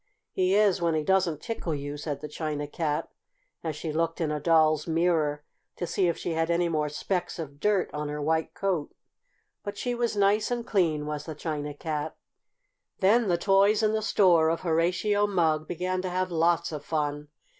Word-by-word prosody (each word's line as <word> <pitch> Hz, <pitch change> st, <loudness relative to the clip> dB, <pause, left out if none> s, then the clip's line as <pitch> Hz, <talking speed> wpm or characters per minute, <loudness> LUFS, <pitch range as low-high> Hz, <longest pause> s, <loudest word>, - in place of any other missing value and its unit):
"He 185 Hz, +1 st, +2 dB
is 205 Hz, -4 st, +3 dB
when 165 Hz, -1 st, +1 dB
he 155 Hz, -, 0 dB
doesn't 180 Hz, -3 st, +1 dB
tickle 205 Hz, -9 st, -3 dB
you," 145 Hz, 0 st, -5 dB
said 145 Hz, -1 st, -5 dB
the 150 Hz, -, -5 dB
China 150 Hz, -1 st, -3 dB
Cat, 150 Hz, 0 st, -2 dB, 0.6 s
as 160 Hz, -2 st, -3 dB
she 155 Hz, +1 st, -4 dB
looked 165 Hz, +1 st, -1 dB
in 160 Hz, -3 st, 0 dB
a 150 Hz, -, -1 dB
Doll's 155 Hz, -1 st, +3 dB
mirror 160 Hz, -3 st, +1 dB, 0.3 s
to 175 Hz, -, -3 dB
see 175 Hz, +2 st, +1 dB
if 170 Hz, -, 0 dB
she -, -, -3 dB
had 165 Hz, +1 st, 0 dB
any 170 Hz, +1 st, +2 dB
more 155 Hz, -2 st, 0 dB
specks 180 Hz, +5 st, -3 dB
of 145 Hz, -4 st, -7 dB
dirt 205 Hz, +1 st, +2 dB
on 150 Hz, 0 st, -3 dB
her 150 Hz, 0 st, -4 dB
white 160 Hz, +2 st, 0 dB
coat. 185 Hz, -7 st, -2 dB, 0.7 s
But 205 Hz, -1 st, -6 dB
she 245 Hz, +3 st, -2 dB
was 235 Hz, -3 st, -1 dB
nice 205 Hz, +2 st, +3 dB
and 240 Hz, -1 st, -2 dB
clean, 165 Hz, -9 st, +1 dB
was 150 Hz, -1 st, -4 dB
the 155 Hz, -, -5 dB
China 150 Hz, -2 st, -4 dB
Cat. 155 Hz, 0 st, -4 dB, 0.8 s
Then 215 Hz, +4 st, +3 dB
the 175 Hz, -2 st, +2 dB
toys 200 Hz, +4 st, +3 dB
in 215 Hz, 0 st, +3 dB
the 220 Hz, -, 0 dB
store 175 Hz, -7 st, +4 dB
of 165 Hz, -, -1 dB
Horatio 180 Hz, +5 st, +1 dB
Mugg 160 Hz, -5 st, +1 dB
began 180 Hz, +1 st, -2 dB
to 185 Hz, -, -3 dB
have 185 Hz, 0 st, -1 dB
lots 170 Hz, +1 st, +2 dB
of 150 Hz, -2 st, -6 dB
fun. 150 Hz, -2 st, -2 dB
165 Hz, 195 wpm, -27 LUFS, 150-190 Hz, 0.8 s, store